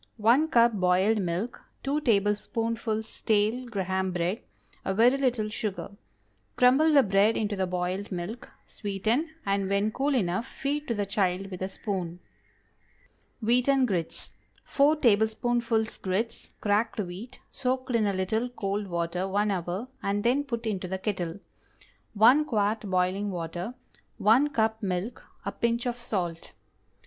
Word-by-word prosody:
✠ -, -, -41 dB
1 235 Hz, +8 st, +4 dB
cup 235 Hz, -6 st, +4 dB
boiled 190 Hz, +3 st, +3 dB
milk. 180 Hz, +6 st, -3 dB, 0.2 s
2 285 Hz, +2 st, 0 dB
tablespoonfuls 220 Hz, 0 st, 0 dB
stale 220 Hz, +4 st, 0 dB
Graham 190 Hz, -3 st, -1 dB
bread. 180 Hz, +5 st, -1 dB, 0.4 s
A 190 Hz, -, -1 dB
very 240 Hz, +5 st, +5 dB
little 250 Hz, -6 st, 0 dB
sugar. 205 Hz, -2 st, -4 dB, 0.6 s
Crumble 265 Hz, +6 st, +5 dB
the 285 Hz, -3 st, +6 dB
bread 200 Hz, +2 st, +3 dB
into 210 Hz, -1 st, -1 dB
the 190 Hz, -1 st, -1 dB
boiled 180 Hz, +3 st, -2 dB
milk, 200 Hz, +8 st, -5 dB, 0.2 s
sweeten, 220 Hz, -, -1 dB, 0.2 s
and 195 Hz, -1 st, 0 dB
when 200 Hz, +2 st, +1 dB
cool 275 Hz, +4 st, 0 dB
enough, 195 Hz, +1 st, 0 dB
feed 290 Hz, +3 st, -3 dB
to 235 Hz, -, -1 dB
the 205 Hz, -1 st, -1 dB
child 195 Hz, -1 st, -1 dB
with 185 Hz, -, -7 dB
a 190 Hz, -, -2 dB
spoon. 185 Hz, -4 st, -4 dB, 1.2 s
WHEATEN 250 Hz, +4 st, +3 dB
GRITS. 180 Hz, -8 st, -3 dB, 0.3 s
✠ -, -, -24 dB
4 290 Hz, +2 st, +3 dB
tablespoonfuls 230 Hz, -1 st, +1 dB
grits 200 Hz, +5 st, -2 dB
(cracked 210 Hz, +2 st, +1 dB
wheat) 195 Hz, +5 st, -6 dB
soaked 260 Hz, -1 st, -2 dB
in 220 Hz, -3 st, +3 dB
a 200 Hz, -, +1 dB
little 220 Hz, +6 st, -1 dB
cold 205 Hz, -3 st, -3 dB
water 170 Hz, +1 st, -2 dB
one 205 Hz, +2 st, +1 dB
hour, 185 Hz, +5 st, -3 dB
and 200 Hz, +1 st, -1 dB
then 255 Hz, +4 st, +2 dB
put 235 Hz, -5 st, -4 dB
into 195 Hz, -4 st, -2 dB
the 190 Hz, +1 st, -3 dB
kettle. 185 Hz, -3 st, -3 dB, 0.8 s
1 250 Hz, +9 st, +6 dB
quart 215 Hz, -4 st, +1 dB
boiling 185 Hz, +2 st, +1 dB
water. 175 Hz, +5 st, -4 dB, 0.4 s
1 245 Hz, +8 st, +4 dB
cup 220 Hz, -4 st, 0 dB
milk. 190 Hz, +3 st, -3 dB, 0.2 s
A -, -, -1 dB
pinch 235 Hz, +1 st, -1 dB
of 245 Hz, 0 st, -2 dB
salt. 175 Hz, -8 st, -3 dB
210 Hz, 145 wpm, -28 LUFS, 190-240 Hz, 1.2 s, the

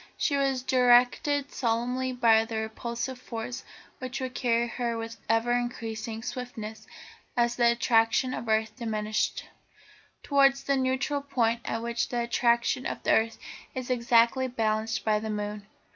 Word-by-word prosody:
She 285 Hz, -, +1 dB
was 270 Hz, -2 st, 0 dB
directed 255 Hz, +3 st, +3 dB
solely 250 Hz, +2 st, -1 dB
by 230 Hz, -3 st, +4 dB
the 225 Hz, -1 st, -4 dB
repulsive 235 Hz, +3 st, -4 dB
force 235 Hz, 0 st, -6 dB, 0.4 s
which 255 Hz, 0 st, -5 dB
would 260 Hz, -1 st, -4 dB
carry 235 Hz, -1 st, +1 dB
her 235 Hz, -1 st, -2 dB
with 225 Hz, 0 st, -6 dB
ever 225 Hz, +1 st, +2 dB
increasing 225 Hz, -2 st, -3 dB
swiftness, 220 Hz, -4 st, -6 dB, 0.5 s
as 240 Hz, 0 st, +2 dB
the 235 Hz, -1 st, +4 dB
attraction 235 Hz, +2 st, +2 dB
of 235 Hz, -, -5 dB
the -, -, +1 dB
earth 220 Hz, 0 st, +1 dB
diminished, 215 Hz, -3 st, -2 dB, 0.8 s
towards 275 Hz, -1 st, +3 dB
that 275 Hz, 0 st, +1 dB
neutral 265 Hz, +2 st, 0 dB
point 235 Hz, -4 st, 0 dB
at 225 Hz, 0 st, -3 dB
which 235 Hz, 0 st, -1 dB
the 240 Hz, -1 st, -1 dB
attraction 235 Hz, +2 st, +1 dB
of -, -, -5 dB
the -, -, +2 dB
earth 225 Hz, 0 st, +2 dB, 0.4 s
is 255 Hz, -1 st, -4 dB
exactly 235 Hz, +1 st, +3 dB
balanced 225 Hz, -2 st, -1 dB
by 215 Hz, -1 st, +2 dB
the 220 Hz, +1 st, -5 dB
moon. 210 Hz, -1 st, -4 dB
235 Hz, 150 wpm, -28 LUFS, 225-255 Hz, 0.8 s, by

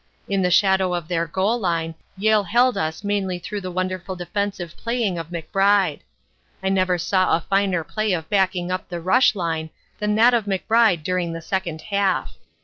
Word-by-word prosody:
In 195 Hz, -1 st, 0 dB
the 180 Hz, -, +2 dB
shadow 190 Hz, 0 st, +3 dB
of 170 Hz, -3 st, -4 dB
their 170 Hz, -1 st, -1 dB
goal 195 Hz, +8 st, 0 dB
line 165 Hz, -4 st, -1 dB, 0.2 s
Yale 215 Hz, 0 st, +3 dB
held 240 Hz, +6 st, +3 dB
us 160 Hz, +4 st, -3 dB
mainly 200 Hz, -3 st, -1 dB
through 200 Hz, +4 st, -5 dB
the 185 Hz, -, -5 dB
wonderful 185 Hz, +1 st, -3 dB
defensive 180 Hz, -1 st, -4 dB
playing 230 Hz, -7 st, -1 dB
of 165 Hz, -, -6 dB
McBride. 195 Hz, +4 st, +1 dB, 0.6 s
I 190 Hz, -, +1 dB
never 185 Hz, -2 st, +2 dB
saw 185 Hz, +1 st, +2 dB
a -, -, -7 dB
finer 195 Hz, -3 st, +1 dB
display 215 Hz, +5 st, -2 dB
of 165 Hz, -3 st, -3 dB
backing 190 Hz, -3 st, +1 dB
up 185 Hz, 0 st, -4 dB
the 175 Hz, -1 st, -4 dB
rush 210 Hz, +8 st, +3 dB
line 165 Hz, -4 st, -2 dB, 0.3 s
than 210 Hz, 0 st, 0 dB
that 235 Hz, +3 st, +5 dB
of 230 Hz, -3 st, +1 dB
McBride 205 Hz, -2 st, +2 dB
during 180 Hz, -1 st, -1 dB
the 165 Hz, -, -6 dB
second 170 Hz, -4 st, -3 dB
half. 200 Hz, -2 st, -1 dB
185 Hz, 180 wpm, -22 LUFS, 175-205 Hz, 0.6 s, that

